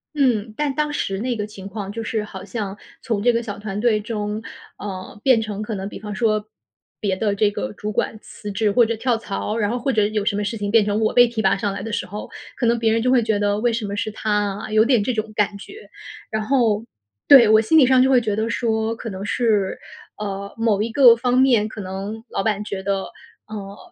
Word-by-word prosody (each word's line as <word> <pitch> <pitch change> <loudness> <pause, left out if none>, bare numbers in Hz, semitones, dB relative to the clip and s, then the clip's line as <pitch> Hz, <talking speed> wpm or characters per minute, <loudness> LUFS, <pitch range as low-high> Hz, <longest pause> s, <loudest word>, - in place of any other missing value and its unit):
嗯， 230 -6 +1
但 295 -2 0
当 300 +1 -1
时 195 -8 -2
那 245 +2 -1
个 210 -2 -3
情 200 -2 -10
况 200 -1 -6
就 225 +2 -5
是 220 0 -2
好 190 -3 -9
像 200 -1 -5 0.2
从 225 -5 -2
这 245 +2 +4
个 235 +1 0
小 205 -2 -6
团 205 -1 -4
队 215 -1 +2
中， 210 0 -4 0.4
呃， 190 0 -7
变 255 -4 +5
成 215 -1 -4
可 215 0 -4
能 195 0 -4
比 - - -9
方 210 -2 -6
说， 215 -1 0 0.5
别 195 -3 0
的 205 0 0
这 205 0 +2
个 105 - -4
主 210 - -5
管 215 - -1
辞 210 - -8
职 205 +1 +1
或 240 +2 +5
者 230 +1 -1
跳 235 +1 0
槽， 215 0 -4
然 210 -3 +1
后 245 - -1
或 265 +3 -1
者 210 -2 +3
有 210 -1 -2
什 205 - +1
么 205 - -1
事 225 +3 -3
情 205 -1 -3
变 225 -2 +5
成 210 +1 0
我 215 - +1
被 245 0 +7
提 230 -2 -3
拔 195 -1 +3
上 200 0 -1
来 195 - -5
的 225 - -5
时 185 - -1
候， 205 +3 -7 0.3
可 240 - 0
能 235 0 +2
别 225 -1 +2
人 225 +1 +2
就 255 - +2
会 250 -2 +5
觉 220 -2 0
得 205 0 0
“为 240 -1 +2
什 225 -1 -2
么 200 0 -4
是 215 +1 -2
她 215 0 -3 0.3
啊？” 215 - -7
有 215 0 +5
点 240 -4 +3
这 250 - -1
种 220 -1 -3
感 210 -1 +1
觉。 400 - -12 0.4
然 220 - -1
后 225 -4 +2 0.4
对， 265 -5 +9
我 220 0 +6
心 320 +9 +3
里 285 - +7
上 260 0 +5
就 265 - +4
会 260 - +5
觉 215 -3 -1
得 220 +2 -1
说， 225 -1 0
可 225 0 -6
能 190 +1 -6
是， 205 -2 +1 0.4
呃， 200 -1 -5
某 225 -3 +1
一 230 - -1
个 240 -2 +7
方 245 +1 0
面 240 -5 +4
可 220 - -9
能 195 +4 -6
老 - - -2
板 210 -2 0
觉 200 -2 -5
得， 195 0 -1 0.4
呃， 200 -2 -7
215 Hz, 270 characters per minute, -21 LUFS, 205-230 Hz, 0.5 s, 对